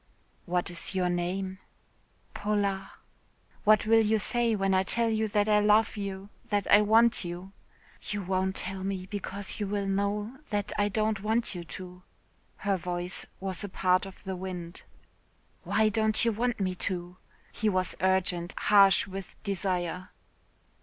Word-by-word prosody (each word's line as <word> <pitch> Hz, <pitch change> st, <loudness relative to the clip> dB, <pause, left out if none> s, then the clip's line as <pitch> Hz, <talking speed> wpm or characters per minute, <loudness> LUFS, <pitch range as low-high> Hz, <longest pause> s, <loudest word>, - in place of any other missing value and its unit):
"What 175 Hz, 0 st, 0 dB
is 175 Hz, +3 st, -5 dB
your 180 Hz, -1 st, +1 dB
name?" 185 Hz, +2 st, -2 dB, 0.7 s
"Paula." 200 Hz, -2 st, -1 dB, 0.7 s
"What 215 Hz, +1 st, +5 dB
will 225 Hz, +1 st, +5 dB
you 220 Hz, +1 st, +3 dB
say 235 Hz, +1 st, +1 dB
when 195 Hz, -1 st, +1 dB
I 185 Hz, -, +4 dB
tell 230 Hz, +4 st, +1 dB
you 220 Hz, 0 st, +1 dB
that 205 Hz, 0 st, +1 dB
I 210 Hz, -1 st, +5 dB
love 210 Hz, +1 st, +4 dB
you, 200 Hz, -1 st, -5 dB, 0.2 s
that 205 Hz, -2 st, +1 dB
I 205 Hz, -, +8 dB
want 225 Hz, +2 st, +4 dB
you?" 175 Hz, +2 st, -6 dB, 0.6 s
"You 205 Hz, -1 st, -2 dB
won't 190 Hz, +1 st, 0 dB
tell 190 Hz, 0 st, -4 dB
me 190 Hz, -1 st, -3 dB
because 200 Hz, +1 st, -5 dB
you 205 Hz, -, -1 dB
will 200 Hz, 0 st, -1 dB
know 205 Hz, +5 st, -1 dB
that 205 Hz, -1 st, -1 dB
I 205 Hz, 0 st, +2 dB
don't 215 Hz, 0 st, 0 dB
want 220 Hz, +2 st, 0 dB
you 175 Hz, -2 st, -6 dB
to." 180 Hz, 0 st, -9 dB, 0.6 s
Her 200 Hz, -2 st, 0 dB
voice 175 Hz, +1 st, -4 dB
was 190 Hz, -1 st, -4 dB
a 205 Hz, -, -4 dB
part 185 Hz, 0 st, +2 dB
of 190 Hz, -, -13 dB
the 190 Hz, -1 st, -4 dB
wind. 180 Hz, -2 st, -6 dB, 0.8 s
"Why 220 Hz, 0 st, +3 dB
don't 220 Hz, +1 st, +1 dB
you 230 Hz, -, +3 dB
want 235 Hz, +2 st, -1 dB
me 185 Hz, -2 st, 0 dB, 0.2 s
to?" 180 Hz, -1 st, -5 dB, 0.3 s
he 215 Hz, -, 0 dB
was 185 Hz, -2 st, 0 dB
urgent 180 Hz, -2 st, +1 dB
harsh 195 Hz, -2 st, +6 dB
with 195 Hz, -1 st, -8 dB
desire. 185 Hz, -2 st, -2 dB
195 Hz, 160 wpm, -29 LUFS, 185-210 Hz, 0.8 s, I